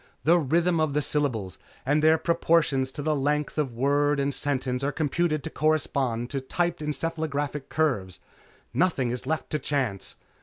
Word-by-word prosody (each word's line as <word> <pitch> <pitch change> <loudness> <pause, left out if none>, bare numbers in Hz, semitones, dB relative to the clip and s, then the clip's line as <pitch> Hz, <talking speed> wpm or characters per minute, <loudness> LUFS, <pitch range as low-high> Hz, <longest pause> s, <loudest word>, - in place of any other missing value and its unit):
The 170 +3 +5
rhythm 165 +3 +2
of 155 -3 0
the 150 - +3
syllables 120 - -1 0.3
and 145 +3 +2
their 160 +1 +5
proportion 165 -5 +2
to 130 +2 -6
the 155 0 +1
length 150 +2 -1
of 140 -4 0
word 145 +3 +2
and 140 0 0
sentence 130 -2 -1
are 140 - +1
computed 155 0 0
to 160 - -5
correspond 140 -6 0
to 135 -1 -2
typed 170 +5 -1
encephalographic 150 -1 -3
curves. 100 - -1 0.5
Nothing 140 -9 +1
is 125 +1 -4
left 155 -2 -2
to 150 - 0
chance. 130 -9 -2
145 Hz, 160 wpm, -26 LUFS, 130-155 Hz, 0.5 s, The